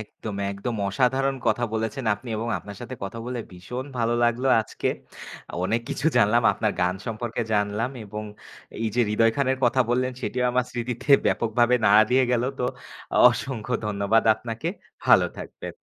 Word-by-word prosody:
একদম, 105 -1 -7
একদম। 100 +5 -4
অসাধারণ 130 +5 +1
কথা 120 -2 +2
বলেছেন 110 +3 -2
আপনি 120 +4 -12
এবং 115 +2 -3
আপনার 100 -1 -10
সাথে 125 +1 -6
কথা 100 +4 -6
বলে 125 0 -3
ভীষণ 115 +9 -6
ভালো 115 0 +1
লাগলো 120 +3 +1
আজকে। 110 - -3 0.8
অনেক 115 +5 +1
কিছু 155 - -2
জানলাম 105 +4 +4
আপনার 110 -2 -1
গান 90 +1 +2
সম্পর্কে 115 +1 -3
জানলাম 105 +4 0
এবং 105 +1 -6 0.6
এইযে 110 +2 0
হৃদয় 115 +1 +3
খানের 130 -1 +1
কথা 125 +2 +3
বললেন 130 +1 +1
সেটিও 125 0 -1
আমার 125 0 +1
স্মৃতিতে 125 +3 -4 0.2
ব্যাপকভাবে 120 +2 +2
নাড়া 105 +1 +7
দিয়ে 130 +1 +4
গেল। 120 -1 +2 0.2
তো - - 0 0.7
অসংখ্য 125 -2 -4
ধন্যবাদ 105 +2 +2
আপনাকে। 115 +8 -5 0.4
ভালো - - +6
থাকবেন। - - -8
115 Hz, 155 wpm, -25 LUFS, 105-125 Hz, 0.8 s, নাড়া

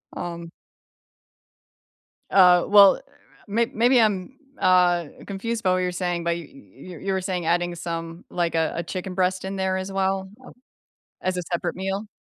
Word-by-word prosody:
Um 170 -1 -6 1.8
Uh, 180 -2 +6
well, 200 - +7 0.5
may 225 +3 +1
maybe 240 +2 +4
I'm, 210 +4 0 0.2
uh, 180 -2 +3 0.2
confused 220 +3 -4
by 185 - +3
what - - +1
you're 180 0 -1
saying, 175 -1 -2
but 170 0 0
y 170 - -8
y 185 -10 -13
you 195 -1 -1
were 190 - -1
saying 180 -2 -3
adding 175 +1 0
some, 165 0 -6
like, 170 -2 -1
a 160 -1 +1
a 170 - -2
chicken 185 +2 -5
breast 185 0 0
in 195 - -4
there 190 -1 0
as 190 +1 -5
well 190 0 -1 0.2
Oh - - -12 0.7
As 185 -1 -1
a - - -1
separate 175 - -2
meal? 195 +3 -3
185 Hz, 165 wpm, -24 LUFS, 175-195 Hz, 1.8 s, well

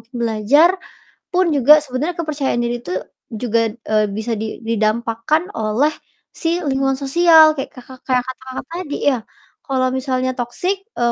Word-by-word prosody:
mungkin 240 +2 -25
belajar, 235 +9 +4 0.6
pun 370 +1 +2
juga 280 +2 +7
sebenernya 295 +5 -3
kepercayaan 290 -6 -1
diri 240 0 -1
itu 180 - -6 0.4
juga, 230 0 0 0.3
eee, 215 0 +3
bisa, 220 +2 -3
di 220 0 -5
didampakkan 230 - 0
oleh 225 +8 +1 0.5
si 340 +1 +1
lingkungan 270 0 0
sosial, 320 +3 +6
kayak 270 - -5
Kaka 255 0 -12
kayak 255 -1 +2
kata 260 0 -7
Kakak 260 0 -6
tadi 335 -4 -5
ya, 260 - +1 0.5
kalau 260 -2 +1
misalnya 255 -1 -1
toxic 245 +11 -2 0.2
eee, 240 0 +2
260 Hz, 150 wpm, -19 LUFS, 235-300 Hz, 0.6 s, juga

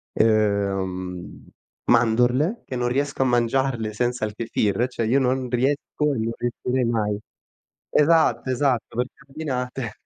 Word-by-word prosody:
uhm, 95 -4 0 0.4
mandorle, 120 - +3
che 130 - -5
non 120 0 0
riesco 140 +2 -1
a - - +4
mangiarle 120 -2 +1
senza 120 0 -1
il 105 - -5
Kefir, 110 0 0
cioè 120 -3 -3
io 130 +5 +3
non 130 0 0
riesco 140 +3 0
e - - -2
non 115 +1 -1
riuscirei 125 +1 -1
mai. 105 -3 0 0.7
Esatto, 160 -3 +3
esatto, 130 -3 0
perché 125 +1 -2
abbinate 130 -5 -4
120 Hz, 130 wpm, -23 LUFS, 110-130 Hz, 0.7 s, a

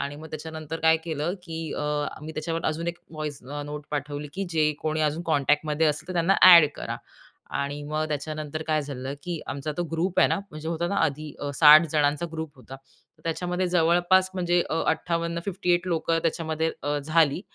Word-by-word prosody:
आणि 140 +1 -4
मग 155 +2 -9
त्याच्यानंतर 160 0 -6
काय 160 0 +5
केलं 160 +1 -2
की 165 -2 -7 0.2
अ, - - -2 0.4
मी 155 +1 -7
त्याच्यावर 165 +1 -3
अजून 160 +2 -2
एक 170 0 -5
व्हॉइस 155 -3 -5
अ, 145 0 -4
नोट 150 0 -7
पाठवली 145 0 -4
की 195 - -2
जे 155 -2 +2
कोणी 155 0 -1
अजून 155 +2 0
कॉन्टॅक्टमध्ये 150 0 +1
असेल 150 +3 -1
तर - - -3
त्यांना 175 +2 +3
ॲड 170 -4 +10
करा - - -4 0.6
आणि 145 +1 -3
मग 155 +1 -2
त्याच्यानंतर 155 +1 -4
काय 155 -1 +1
झालं 135 -1 -5
की 175 -1 -4
आमचा 140 +2 -3
तो 175 - 0
ग्रुप 175 +3 -1
आहेना - - +3
म्हणजे 155 +1 -7
होताना 170 +3 -1
आधी 150 0 -3 0.2
60 155 +2 +8
जणांचा 150 +1 +1
ग्रुप 160 -2 -6
होता. 130 +1 -11 0.5
त्याच्यामध्ये 180 +2 -1
जवळपास 175 +2 +3
म्हणजे 175 -1 +2
अ, 165 - 0
58, 170 +1 -1
58 180 -2 0
लोकं 165 -1 +1
त्याच्यामध्ये 160 -1 -1
अ, 145 +1 0
झाली. 155 +2 +2
160 Hz, 180 wpm, -26 LUFS, 150-170 Hz, 0.6 s, ॲड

